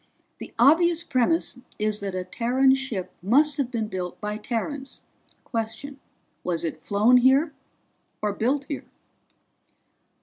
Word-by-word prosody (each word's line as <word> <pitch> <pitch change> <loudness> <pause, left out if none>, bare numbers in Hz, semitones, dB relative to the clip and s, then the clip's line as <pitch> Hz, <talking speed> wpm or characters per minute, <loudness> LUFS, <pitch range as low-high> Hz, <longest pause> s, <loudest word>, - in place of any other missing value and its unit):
"The - - -8
obvious 330 +7 +5
premise 260 +1 +1 0.2
is 210 0 0
that 195 -2 -4
a 185 - -2
Terran 255 +6 +2
ship 255 -9 -2
must 285 - +3
have 275 -4 0
been 230 -4 -2
built 185 -3 -5
by 210 0 -3
Terrans. 265 +5 -4 0.4
Question: 230 +5 -5 0.4
Was 170 -2 -2
it 165 - -3
flown 215 +5 +4
here, 270 +5 +4 0.7
or 210 -1 -1
built 265 +7 0
here?" 290 - -5
245 Hz, 130 wpm, -25 LUFS, 210-275 Hz, 0.7 s, obvious